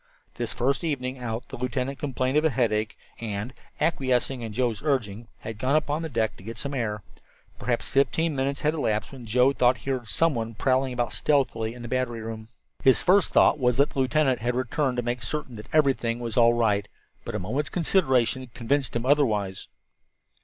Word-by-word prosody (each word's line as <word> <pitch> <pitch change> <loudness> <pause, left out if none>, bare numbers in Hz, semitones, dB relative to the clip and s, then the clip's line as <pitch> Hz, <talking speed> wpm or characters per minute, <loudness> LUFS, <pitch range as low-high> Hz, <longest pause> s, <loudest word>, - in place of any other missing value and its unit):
This - - -3
first 135 +6 0
evening 130 -5 -2
out 115 -1 -5
the - - -7
lieutenant 125 +2 -2
complained 130 -1 -1
of 150 - +4
a 160 - +4
headache, 110 -4 0 0.2
and, 110 +2 -4 0.3
acquiescing 130 -4 +1
in 115 -2 -5
Joe's 120 -1 -1
urging, 120 -7 -1
had 110 -1 -7
gone 130 +5 +1
upon 150 0 +1
deck 115 -9 -1
to - - -14
get 115 +2 -7
the 140 +4 -3
air. 105 -5 -2 0.6
Perhaps 120 -2 -1
fifteen 150 +3 +1
minutes 140 +1 -1
had 150 +1 +2
elapsed 110 -9 -1
when 125 -4 -10
Joe 125 +5 +4
thought 125 -1 +3
he 135 - -4
heard 125 -3 -3
someone 115 - 0
prowling 130 +3 +1
about 120 -1 -2
stealthily 120 -6 +1
in 120 - -9
the - - -5
battery 120 -2 -1
room. 110 0 -6 0.4
His 130 - +5
first 185 +1 +4
thought - - +5
was 125 -2 +2
that 140 +1 +3
the - - -4
lieutenant 135 0 +2
had 120 +1 -1
returned 130 +1 0
to 120 - 0
make 120 +1 -2
certain 130 +1 -3
that 105 - -10
everything 135 -6 +2
was 115 -2 -4
all 120 -1 +5
right, 105 -3 +1 0.4
but 115 - -5
a - - +1
moment's 130 +10 -2
consideration 130 - +1
convinced 135 +3 0
him 120 +1 -1
otherwise. 110 -10 +1
125 Hz, 190 wpm, -26 LUFS, 115-140 Hz, 0.6 s, His